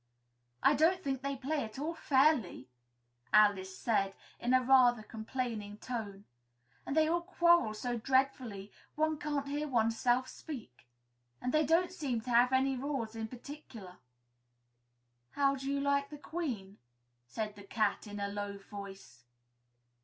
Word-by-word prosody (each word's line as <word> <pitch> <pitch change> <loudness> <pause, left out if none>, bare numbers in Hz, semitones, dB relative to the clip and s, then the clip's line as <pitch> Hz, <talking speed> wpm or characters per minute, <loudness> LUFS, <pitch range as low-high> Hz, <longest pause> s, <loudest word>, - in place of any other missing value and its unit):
"I - - +6
don't 335 +6 +3
think 270 -2 -2
they 275 0 -2
play 280 +3 -2
at 220 +1 -8
all 305 +5 -2
fairly," 265 - +2 0.6
Alice 195 -3 +4
said, 195 -4 0 0.2
in 245 - -1
a 255 0 +5
rather 245 -3 +5
complaining 220 -2 -4
tone; 210 -4 -6 0.6
"and 275 - -2
they 310 0 +5
all 340 +2 +1
quarrel 345 -10 +3
so 240 +2 -3
dreadfully 255 -5 0 0.2
one 310 0 +1
can't 295 -2 -2
hear 295 +2 -2
oneself 240 +1 +2
speak 230 - -9 0.5
and 250 - -2
they 310 0 +4
don't 335 +5 +2
seem 280 -10 -2
to 245 - -5
have 240 +2 +5
any 265 +1 +2
rules 255 -4 -3
in 225 -1 -3
particular." 235 -7 -10 1.4
"How 275 -1 +2
do 270 +1 -4
you 280 - 0
like 280 0 +1
the 295 - -8
Queen?" 250 - -5 0.5
said 210 - -4
the 205 - -11
Cat 210 +1 -1
in 205 0 -7
a 200 - -1
low 200 0 -4
voice. 195 - -11
250 Hz, 145 wpm, -33 LUFS, 210-280 Hz, 1.4 s, I